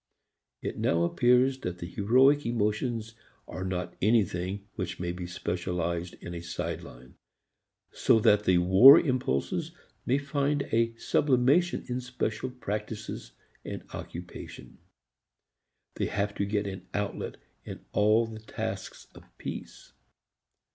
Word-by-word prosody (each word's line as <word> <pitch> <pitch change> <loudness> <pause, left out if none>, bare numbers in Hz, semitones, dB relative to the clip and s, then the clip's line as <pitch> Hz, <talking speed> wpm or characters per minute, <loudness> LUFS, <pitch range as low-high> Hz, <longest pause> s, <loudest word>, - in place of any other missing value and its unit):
It - - -4
now 85 0 +2
appears 125 +8 +3
that 90 -8 -4
the 85 - -6
heroic 130 +10 +4
emotions 115 0 -1 0.3
are 90 - -6
not 95 -1 -3
anything 100 -2 +1
which 90 -3 -5
may 90 -1 -2
be 90 0 -6
specialized 90 -1 -3
in 85 - -9
a 85 - -5
side 85 0 -4
line, 60 +1 -13 0.8
so 115 - +3
that 105 0 +4
the 90 - +4
war 95 - +9
impulses 125 - -1 0.3
may 130 - +3
find 140 0 0
a 115 0 +2
sublimation 140 +8 +2
in 125 0 -2
special 125 -1 -3
practices 105 - -5 0.3
and - - -6
occupations. 90 +1 -9 1.2
They - - 0
have 100 +1 -1
to 100 - -1
get 105 0 -1
an 95 -2 -6
outlet 105 -1 -3 0.3
in - - -9
all 110 +3 +4
the 110 -1 -8
tasks 110 - -6
of - - -14
peace. - - -8
105 Hz, 125 wpm, -28 LUFS, 90-125 Hz, 1.2 s, war